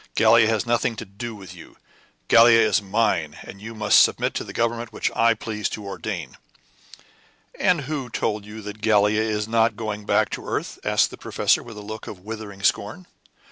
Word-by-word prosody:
Gallia 115 0 +5
has 110 0 0
nothing 120 0 0
to 115 - -7
do 110 +4 -7
with 95 -3 -11
you. 90 - -14 0.5
Gallia 115 0 +7
is 105 -3 +3
mine; 95 -7 0
and 100 - -11
you 115 +1 -8
must 105 -1 +5
submit - - +2
to - - -3
the - - -9
government 115 0 -2
which - - -2
I 115 0 +4
please 105 -2 -4
to 105 - -7
ordain." 95 - -6 1.2
"And 180 -4 +2
who 140 -2 -4
told 105 -2 -2
you 105 +1 -10
that 105 +1 -8
Gallia 105 -1 +3
is 105 -1 -1
not 115 -1 +2
going 105 -2 -5
back - - +2
to - - -4
the - - -12
earth?" - - -4
asked - - +2
the - - -10
professor, - - +1
with 115 -3 -11
a 105 - -8
look 110 +1 -8
of 105 - -7
withering 105 -1 -8
scorn. 110 - 0
110 Hz, 195 wpm, -23 LUFS, 105-115 Hz, 1.2 s, Gallia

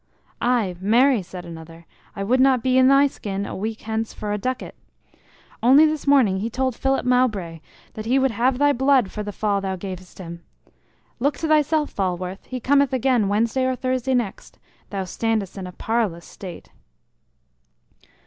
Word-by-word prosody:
"Aye, 235 -6 +1
marry!" 235 +4 +4
said 180 0 -9
another. 165 0 -11 0.3
"I 195 - -3
would 250 +6 +2
not 260 -2 +4
be 255 -1 +2
in 260 - +6
thy 275 +1 +6
skin 200 -7 -4
a - - -6
week 220 +3 -4
hence 220 0 -3
for 210 -1 -3
a - - -1
ducat! 255 +4 -4 0.9
Only 270 +6 +7
this 305 -2 -2
morning 245 -10 +4
he 220 +4 -2
told 260 +1 -1
Philip 270 0 0
Mowbray 215 -10 +1 0.3
that 215 0 -7
he 255 +3 +3
would 265 -1 +2
have 245 +4 +1
thy 290 +1 +3
blood 265 -5 +3
for 210 - -5
the 205 0 -5
fall 200 0 -1
thou 190 -1 -2
gavest 185 -1 -8
him. 170 -2 -8 0.8
Look 285 +4 0
to 325 - -2
thyself, 305 0 +2
Falworth; 185 0 -3
he 255 - -5
cometh 280 +1 +2
again 255 -4 +2
Wednesday 230 +5 +1
or 260 0 0
Thursday 255 0 -1
next; 235 -6 -3 0.3
thou 195 -2 -3
standest 220 0 -2
in 190 -2 -6
a - - -8
parlous 205 -5 -2
state." 180 -4 -10
225 Hz, 175 wpm, -22 LUFS, 195-260 Hz, 0.9 s, Only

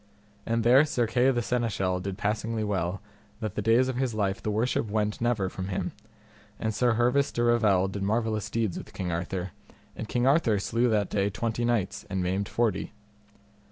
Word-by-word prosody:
And 115 0 +1
there 125 +5 +7
Sir 125 -6 0
Kay 125 +3 +3
the 120 -3 +1
seneschal 105 -7 0
did 95 +1 -5
passingly 110 +2 -1
well, 95 -2 -1 0.4
that 110 -4 -3
the 105 - -2
days 115 +4 +4
of 130 -2 -2
his 130 -4 -1
life 100 -2 -1
the - - -2
worship 110 +1 0
went 105 0 -1
never 115 -5 +1
from 95 0 -5
him; 95 - -2 0.7
and 110 -1 -1
Sir 120 +2 +2
Hervis 125 +5 +2
de 120 - -1
Revel 110 -6 +3
did 95 +1 -5
marvellous 110 0 0
deeds 110 -4 -1
with - - -12
King 90 -2 -3
Arthur, 90 +2 -3 0.4
and 110 - -6
King 120 0 +1
Arthur 135 -6 +3
slew 115 +5 +1
that 105 -3 +1
day 100 -1 +1
twenty 115 +4 -2
knights 120 -5 0
and 95 -1 -1
maimed 95 +3 -1
forty. 115 -2 -1
110 Hz, 190 wpm, -27 LUFS, 100-120 Hz, 0.7 s, there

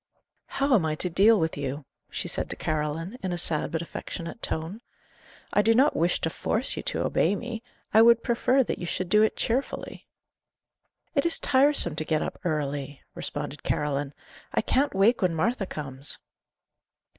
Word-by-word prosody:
"How 275 0 0
am 205 -9 +4
I 155 -1 0
to 180 +3 -3
deal 205 +5 +5
with 160 -1 -1
you?" 140 0 -4 0.2
she - - -4
said - - -2
to - - -4
Caroline, 155 +8 -3
in 185 - -3
a 175 - -2
sad 160 -2 +2
but 165 0 -2
affectionate 170 +4 -7
tone. 165 +8 -4 0.7
"I 205 - +5
do 225 +2 +3
not 270 +5 +4
wish 170 +2 +1
to 160 - -1
force 225 +10 0
you - - -4
to - - -2
obey 205 - +2
me; 235 0 -5 0.3
I 220 - +7
would 235 0 +6
prefer 250 +3 +2
that - - -4
you 175 - -5
should 180 +1 -3
do 210 +3 +5
it 220 - +2
cheerfully." 255 +4 -3 1.1
"It 280 - +2
is 340 - +3
tiresome 265 - +3
to 155 - -1
get 155 -1 0
up - - -6
early," 145 -4 -3
responded 145 0 -5
Caroline. 145 -1 -2 0.4
"I - - +1
can't 275 -4 +1
wake 215 +5 +4
when 180 -3 +1
Martha 205 +4 0
comes." 135 -3 -1
180 Hz, 180 wpm, -26 LUFS, 155-230 Hz, 1.1 s, I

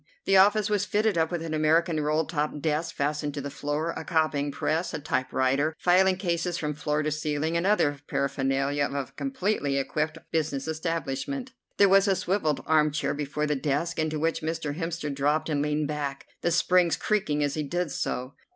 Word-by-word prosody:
The 195 - +3
office 205 +2 +5
was 210 -2 +1
fitted 210 0 +1
up 160 -1 +2
with 175 -2 -3
an 165 -1 -4
American 155 +1 +2
roll 155 +1 +1
top 150 -2 -2
desk 155 +2 -1
fastened 145 0 -1
to - - -3
the 140 +1 -5
floor, 150 +4 -2
a - - -6
copying 155 -4 0
press, 160 +4 -1
a - - -3
typewriter, 135 +2 0
filing 185 +1 +4
cases 175 -2 -1
from 150 -1 -2
floor 150 +1 -1
to 155 - -1
ceiling, 155 +1 -1
and 170 +3 +1
other 145 -9 +2
paraphernalia 140 +1 0
of - - -7
a - - -25
completely 205 - -1
equipped 150 +3 -1
business 155 -3 -1
establishment. 165 - -3 0.3
There 200 - +6
was 195 +1 +5
a 195 - +3
swivelled 175 -6 0
armchair 150 -1 +2
before 145 +1 -2
the 150 0 0
desk, 150 +5 -1
into 155 0 0
which 165 +2 0
Mr. 160 -2 -3
Hemster 165 -3 -3
dropped 145 +4 0
and 145 -2 0
leaned 150 0 0
back, 145 -2 -4 0.2
the - - +1
springs 175 0 +3
creaking 155 -9 0
as 145 -1 0
he 155 - -2
did 175 +2 -2
so. 130 0 -3
155 Hz, 190 wpm, -27 LUFS, 145-170 Hz, 0.3 s, There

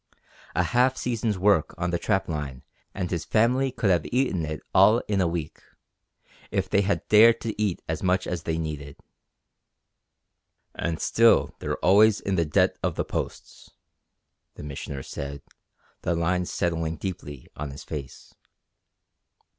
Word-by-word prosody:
A - - +3
half 125 +1 +2
season's 115 -4 -1
work 95 -4 +2
on 85 +1 -1
the 85 - 0
trap 95 0 0
line 75 -5 -5 0.3
and 90 -3 -4
his 85 -3 -1
family 125 +4 +2
could 115 -5 +1
have 85 -3 +2
eaten 115 - 0
it 75 0 -4
all 110 +2 +6
in 100 -2 +1
a 90 - +2
week 85 -2 -4 0.9
if 95 -1 -1
they 100 - +2
had 100 0 -1
dared 110 +2 +7
to 110 -2 -4
eat 100 -5 -1
as 80 -1 -3
much 95 0 +1
as 90 -2 -3
they 80 0 -2
needed. 75 -3 -5 1.8
"And 85 -2 -3
still 115 0 +4
they're - - -3
always 105 +3 +6
in 100 - -2
the 85 -3 +2
debt 75 - +2
of - - -1
the - - -2
Posts," - - -6 0.9
the - - -9
Missioner 70 -1 -6
said, 70 +2 -7 0.6
the 85 - 0
lines 90 +2 0
settling 80 -2 -1
deeply 75 -8 -6
on 75 0 -5
his 70 +1 -9
face. 70 -5 -8
90 Hz, 155 wpm, -26 LUFS, 80-105 Hz, 1.8 s, dared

